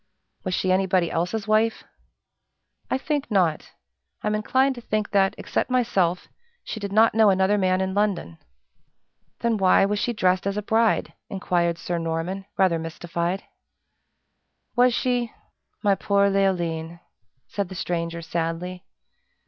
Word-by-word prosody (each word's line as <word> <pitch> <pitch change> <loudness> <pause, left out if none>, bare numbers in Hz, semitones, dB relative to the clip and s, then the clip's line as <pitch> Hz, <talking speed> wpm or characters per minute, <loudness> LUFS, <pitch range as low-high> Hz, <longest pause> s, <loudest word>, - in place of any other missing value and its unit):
"Was 185 -2 -1
she 185 - 0
anybody 185 -2 +2
else's 185 +6 -2
wife?" 215 +1 +2 1.1
"I - - +1
think 290 +1 -2
not. 180 -7 +1 0.5
I'm 210 - 0
inclined 260 +6 +2
to 240 - -10
think 215 -2 -2
that, 195 -1 +3
except - - -2
myself, 200 -9 +1 0.4
she 220 - -6
did 200 -1 -5
not 220 +2 +5
know 220 -1 +5
another 190 +1 +3
man 185 -2 +2
in 190 0 -1
London." 195 - -1 1.0
"Then 230 -2 +1
why 190 0 +4
was 205 +1 -1
she 240 - 0
dressed 185 -3 +1
as 200 +1 -1
a 210 - -2
bride?" 225 +1 +1 0.2
inquired 175 -3 0
Sir 175 0 -3
Norman, 165 +4 -3
rather 185 -4 +3
mystified. 170 +3 -3 1.3
"Was 245 0 +4
she? 245 -2 0 0.5
My 205 -1 +4
poor 200 0 +2
Leoline!" 170 -4 0 0.5
said 200 -3 -3
the 190 - -8
stranger, 170 -1 -3
sadly. 170 +2 -3
195 Hz, 140 wpm, -24 LUFS, 175-215 Hz, 1.3 s, not